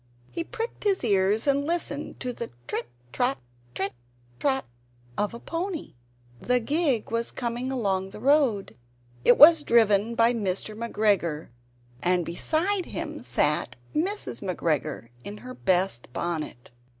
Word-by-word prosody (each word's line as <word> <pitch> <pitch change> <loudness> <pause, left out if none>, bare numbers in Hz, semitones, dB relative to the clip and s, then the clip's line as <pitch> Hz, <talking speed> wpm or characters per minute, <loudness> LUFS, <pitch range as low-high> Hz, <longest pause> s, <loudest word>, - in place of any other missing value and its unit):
He 335 - -3
pricked 455 +7 -5
his 395 -6 +1
ears 200 0 +2
and 280 0 +2
listened 305 -2 -2
to 250 -1 -2
the 235 - -5 0.2
trit - - -3 0.2
trot, 250 +2 +1 0.4
trit 195 +6 -2 0.5
trot 265 -1 +1 0.5
of 210 +3 -1
a - - -8
pony. 340 +2 -4 0.6
A 250 0 +5
gig 280 -2 0
was 230 0 0
coming 245 +1 -3
along 195 -7 0
the 200 - -10
road; 245 - +2 0.5
it 245 - +6
was 320 +2 +9
driven 225 -3 +3
by 230 +1 +4
Mr. 210 -1 -2
McGregor, 205 -8 0 0.5
and 180 -1 +2
beside 340 - 0
him - - -5
sat - - +1 0.2
Mrs. 370 - -1
McGregor 155 - -2
in 205 +7 -7
her 255 - -6
best 185 - +1
bonnet. 155 -8 -4
235 Hz, 135 wpm, -26 LUFS, 195-285 Hz, 0.6 s, was